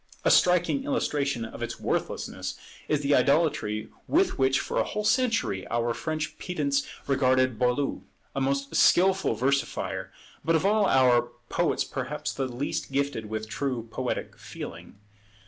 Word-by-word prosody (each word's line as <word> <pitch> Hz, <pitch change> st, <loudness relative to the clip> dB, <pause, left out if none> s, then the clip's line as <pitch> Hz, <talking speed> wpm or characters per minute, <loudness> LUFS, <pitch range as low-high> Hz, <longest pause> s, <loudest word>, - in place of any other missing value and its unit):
A -, -, +5 dB
striking 180 Hz, +10 st, +4 dB
illustration 145 Hz, -, -1 dB
of 110 Hz, -, -9 dB
its -, -, -4 dB
worthlessness -, -, -3 dB, 0.3 s
is 150 Hz, -1 st, +1 dB
the 145 Hz, 0 st, +2 dB
idolatry 140 Hz, -6 st, +2 dB, 0.2 s
with 355 Hz, -, +2 dB
which 135 Hz, 0 st, +3 dB
for -, -, -2 dB
a -, -, +3 dB
whole 210 Hz, -, -3 dB
century 225 Hz, -, +1 dB
our 120 Hz, 0 st, 0 dB
French 155 Hz, +3 st, -4 dB
pedants 140 Hz, -6 st, -1 dB, 0.2 s
regarded 130 Hz, -3 st, +2 dB
Boileau; 125 Hz, +3 st, +1 dB, 0.3 s
a 135 Hz, -, -1 dB
most 140 Hz, +1 st, -1 dB
skilful 190 Hz, -7 st, +4 dB
versifier, 135 Hz, +4 st, -1 dB, 0.3 s
but 165 Hz, 0 st, +2 dB
of 160 Hz, -, +1 dB
all 210 Hz, 0 st, +4 dB
our 125 Hz, -2 st, +4 dB, 0.2 s
poets -, -, +1 dB
perhaps -, -, -4 dB
the 135 Hz, -1 st, -2 dB
least 130 Hz, +2 st, -3 dB
gifted 140 Hz, -5 st, -1 dB
with 110 Hz, 0 st, -4 dB
true 125 Hz, -1 st, -3 dB
poetic -, -, -3 dB
feeling. -, -, -9 dB
140 Hz, 145 wpm, -27 LUFS, 125-165 Hz, 0.3 s, A